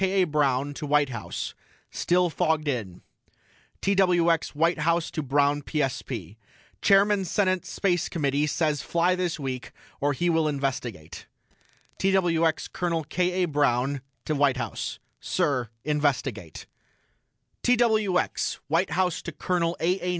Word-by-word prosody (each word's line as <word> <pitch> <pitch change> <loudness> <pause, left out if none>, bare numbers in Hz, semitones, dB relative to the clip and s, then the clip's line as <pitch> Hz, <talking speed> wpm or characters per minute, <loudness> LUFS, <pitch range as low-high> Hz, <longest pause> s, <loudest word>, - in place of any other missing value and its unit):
A. 190 0 +3
BROWN 145 -3 +1
TO 150 +1 -6
WHITE 145 -1 +3
HOUSE: 115 -5 -5 0.4
STILL 180 -1 +1
FOGGED 160 -3 0
IN 110 -10 -3 0.8
TWX 175 -5 +2
WHITE 165 +3 +2
HOUSE 170 +2 +1
TO 155 - -2
BROWN 145 +1 +2
PSP: 125 - -3 0.4
CHAIRMAN 200 0 +4
SENATE 185 0 0
SPACE 175 -4 0
COMMITTEE 145 -2 0
SAYS 150 -1 0
FLY 170 +2 +1
THIS 180 -3 -2
WEEK 130 -3 -4 0.3
OR 145 +1 +1
HE 175 +5 +1
WILL 160 -1 +2
INVESTIGATE 130 - -4 0.7
TWX 175 -4 +1
COL. 170 -2 -1
K. 180 0 +1
A. - - +4
BROWN 140 -2 +1 0.2
TO 155 - 0
WHITE 140 -3 +2
HOUSE: 115 -4 -4 0.2
SIR 140 - 0 0.2
INVESTIGATE 135 - -1 1.0
TWX 220 -6 +2
WHITE 165 +5 +2
HOUSE 180 -2 0
TO 170 - -6
COL. 170 +1 -1
A. 180 +4 +1
A. 180 - -2
160 Hz, 130 wpm, -26 LUFS, 140-180 Hz, 1.0 s, CHAIRMAN